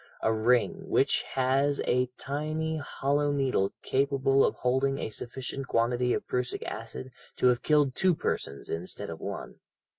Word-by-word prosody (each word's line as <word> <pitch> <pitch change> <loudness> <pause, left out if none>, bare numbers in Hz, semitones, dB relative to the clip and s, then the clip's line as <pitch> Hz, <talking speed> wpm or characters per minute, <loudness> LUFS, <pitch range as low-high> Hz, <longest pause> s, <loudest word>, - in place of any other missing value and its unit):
a 110 - +3
ring, 125 - +1
which 140 -5 +3
has 135 +2 +2
a 125 0 +2
tiny 155 +3 -2
hollow 145 0 0
needle 135 -8 +1
capable 135 0 +2
of - - +2
holding 130 +2 +1
a 110 - -4
sufficient 130 +4 -4
quantity 120 +1 +1
of - - -1
prussic 125 0 -2
acid 115 +3 -6 0.3
to - - +1
have 125 -1 +4
killed 150 -3 +3
two 185 -3 +3
persons 70 - -3
instead 85 +3 -4
of - - -7
one. - - -6
135 Hz, 150 wpm, -29 LUFS, 125-145 Hz, 0.3 s, have